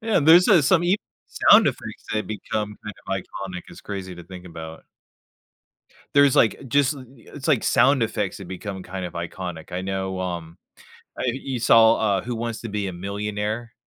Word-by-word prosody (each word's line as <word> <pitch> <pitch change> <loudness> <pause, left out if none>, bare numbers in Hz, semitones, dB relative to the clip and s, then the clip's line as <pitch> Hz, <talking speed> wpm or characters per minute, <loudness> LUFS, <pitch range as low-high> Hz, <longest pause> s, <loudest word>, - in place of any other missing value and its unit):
Yeah 225 -1 0
and 145 - 0
there's, 175 +3 +8
uh, 175 -7 +6
some 175 +4 +4
e 185 +4 +3 0.3
sound - - +6
effects - - -4
that 110 0 -1
become 105 0 -4
kind 105 - -7
of 95 - -3
iconic, 95 -1 -5
it's - - -12
crazy 95 -3 -6
to 85 -1 -11
think 90 0 -11
about. 80 -2 -9 1.3
There's, 140 -2 +5
like, 110 - +4
uh, - - -11
just, 140 +2 +2
eh - - -10 0.4
it's 145 +1 -6
like 140 -7 +3
sound 135 -1 +4
effects 105 -4 -2
that 95 -3 -10
become 95 0 -6
kind 95 0 -6
of - - -10
iconic. 85 0 -6
I 90 - -2
know, 95 0 -3
um, 85 -2 -5 0.6
I - - -3
you 130 0 -2
saw, 115 -1 +6
uh, 100 -4 +1
Who 120 0 -4
Wants 115 0 -4
to 115 - -6
Be 100 -1 -2
a 90 - -5
Millionaire? 105 +4 -4
105 Hz, 195 wpm, -23 LUFS, 95-120 Hz, 1.3 s, there's